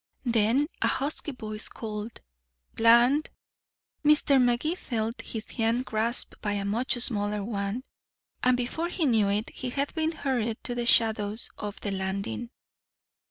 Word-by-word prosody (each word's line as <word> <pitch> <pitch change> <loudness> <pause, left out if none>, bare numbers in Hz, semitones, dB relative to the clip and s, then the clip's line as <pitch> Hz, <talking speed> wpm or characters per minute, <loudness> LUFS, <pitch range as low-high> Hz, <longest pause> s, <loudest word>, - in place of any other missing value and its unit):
Then 235 +4 +3 0.2
a - - +3
husky 295 +2 -1
voice 215 -4 -4
called 215 0 -6 0.5
"Bland". 240 +6 +5 0.7
Mr. 295 -2 +5
Magee 245 +6 +2
felt 230 -8 -3
his 220 -1 -6
hand 230 +2 0
grasped 225 +2 0
by 210 -1 -1
a 200 -1 -2
much 230 +7 +2
smaller 210 -4 -1
one, 200 +2 -3 0.6
and 250 0 +3
before 255 +7 -2
he 350 -2 0
knew 220 -6 +3
it 210 +2 -1
he 255 - -5
had 280 +3 -2
been 320 0 0
hurried 240 -7 -1
to 245 - -3
the 240 -1 -2
shadows 220 -1 +2
of 210 0 -5
the 205 - -2
landing. 195 +5 -3
230 Hz, 145 wpm, -28 LUFS, 210-255 Hz, 0.7 s, Bland